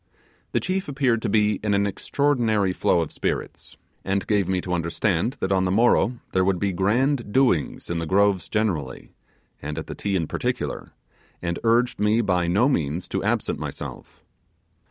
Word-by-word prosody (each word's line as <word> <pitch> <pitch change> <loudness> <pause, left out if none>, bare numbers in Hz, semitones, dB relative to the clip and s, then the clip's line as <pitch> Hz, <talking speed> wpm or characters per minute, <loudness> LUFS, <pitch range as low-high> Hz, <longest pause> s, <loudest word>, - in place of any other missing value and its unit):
The - - +3
chief 190 +1 -2
appeared 135 -5 +1
to - - -1
be 105 -2 +2
in 105 -2 +1
an 100 0 +2
extraordinary 110 -3 +1
flow 85 - +2
of 80 - -4
spirits - - -4 0.3
and 100 +1 -1
gave 100 -4 +1
me 95 -1 0
to 90 - -4
understand 85 +5 0
that 95 - -1
on 95 -1 +2
the 90 - 0
morrow 120 +3 +3
there 95 - +2
would 95 0 +1
be 100 +2 0
grand 115 +6 +1
doings 120 - +1
in 85 -1 -2
the 80 - -3
Groves 100 0 +2
generally, 95 -12 -2 0.5
and 75 +2 -5
at 80 - -4
the - - -7
Ti 100 -1 -2
in 85 -3 +1
particular; - - -3 0.5
and 85 -1 -3
urged 120 +2 +2
me 105 +2 +3
by 90 -5 +1
no 100 +9 +3
means 85 - -1
to - - -2
absent - - -1
myself. - - -8
100 Hz, 175 wpm, -24 LUFS, 90-115 Hz, 0.5 s, The